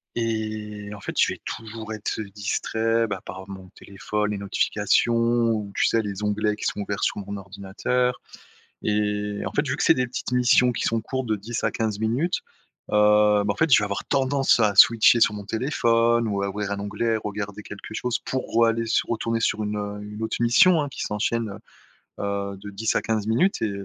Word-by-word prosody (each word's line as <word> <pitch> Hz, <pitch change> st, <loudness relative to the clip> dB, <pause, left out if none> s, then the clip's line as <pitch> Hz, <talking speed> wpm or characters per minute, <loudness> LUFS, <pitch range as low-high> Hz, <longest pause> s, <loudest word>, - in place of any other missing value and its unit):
et 110 Hz, -2 st, -3 dB
en 105 Hz, -, -9 dB
fait, -, -, -6 dB
je -, -, +4 dB
vais -, -, -12 dB
toujours 110 Hz, 0 st, -6 dB
être 110 Hz, 0 st, -4 dB
distrait, 110 Hz, +3 st, -1 dB
bah, 95 Hz, -3 st, -4 dB
par 95 Hz, +1 st, -8 dB
mon 95 Hz, -1 st, -9 dB
téléphone, 105 Hz, +2 st, -3 dB
les 105 Hz, -, -3 dB
notifications 105 Hz, +3 st, +1 dB
ou, 115 Hz, -3 st, +1 dB
tu -, -, +3 dB
sais, 115 Hz, -, +2 dB
les 100 Hz, 0 st, -5 dB
onglets 105 Hz, 0 st, 0 dB
qui -, -, -6 dB
sont 105 Hz, -, -1 dB
ouverts 100 Hz, 0 st, -3 dB
sur -, -, -1 dB
mon 100 Hz, +1 st, -5 dB
ordinateur 100 Hz, +6 st, -2 dB, 0.6 s
et 105 Hz, -1 st, -1 dB
en -, -, -3 dB
fait, 145 Hz, -1 st, 0 dB
vu 130 Hz, -, -1 dB
que -, -, 0 dB
c'est -, -, +6 dB
des 125 Hz, 0 st, 0 dB
petites 125 Hz, 0 st, -5 dB
missions 125 Hz, 0 st, +4 dB
qui -, -, -3 dB
sont 115 Hz, 0 st, +1 dB
courtes 130 Hz, +2 st, -4 dB
de 110 Hz, -, +1 dB
10 115 Hz, +4 st, -5 dB
à -, -, +3 dB
15 110 Hz, -2 st, -2 dB
minutes, 125 Hz, +11 st, 0 dB, 0.5 s
heu, 105 Hz, 0 st, +4 dB
ben, -, -, -4 dB
en 100 Hz, -, +1 dB
fait, 160 Hz, +4 st, +1 dB
je -, -, +8 dB
vais 105 Hz, -, -1 dB
avoir 100 Hz, +1 st, -4 dB
tendance 135 Hz, -1 st, +2 dB
à 105 Hz, -3 st, +2 dB
switcher 115 Hz, +3 st, +7 dB
sur 105 Hz, -, +5 dB
mon 100 Hz, -, -7 dB
téléphone 120 Hz, -1 st, +1 dB
ou 100 Hz, -2 st, -1 dB
à 100 Hz, -, -1 dB
ouvrir 100 Hz, 0 st, -4 dB
un 100 Hz, -, -2 dB
onglet 110 Hz, +3 st, -1 dB
et -, -, +1 dB
regarder 105 Hz, -1 st, -5 dB
quelque 105 Hz, +1 st, -9 dB
chose 120 Hz, +2 st, -2 dB
pour 130 Hz, -, -2 dB
re-aller 115 Hz, 0 st, +3 dB
sur 110 Hz, -, 0 dB
retourner 115 Hz, 0 st, -1 dB
sur 110 Hz, -1 st, 0 dB
une, 105 Hz, 0 st, -2 dB
heu, 105 Hz, 0 st, -5 dB
une 105 Hz, +1 st, -8 dB
autre 110 Hz, -, -2 dB
mission, 155 Hz, +9 st, +5 dB
hein, 145 Hz, -, -2 dB
qui -, -, -7 dB
s'enchaîne, 110 Hz, +2 st, -1 dB
heu 100 Hz, -, -8 dB, 0.6 s
heu, 100 Hz, -1 st, -3 dB
de 105 Hz, -, -7 dB
10 110 Hz, +3 st, -1 dB
à -, -, +2 dB
15 110 Hz, -2 st, -2 dB
minutes 150 Hz, -, +2 dB
et 110 Hz, -, 0 dB
110 Hz, 215 wpm, -24 LUFS, 105-115 Hz, 0.6 s, je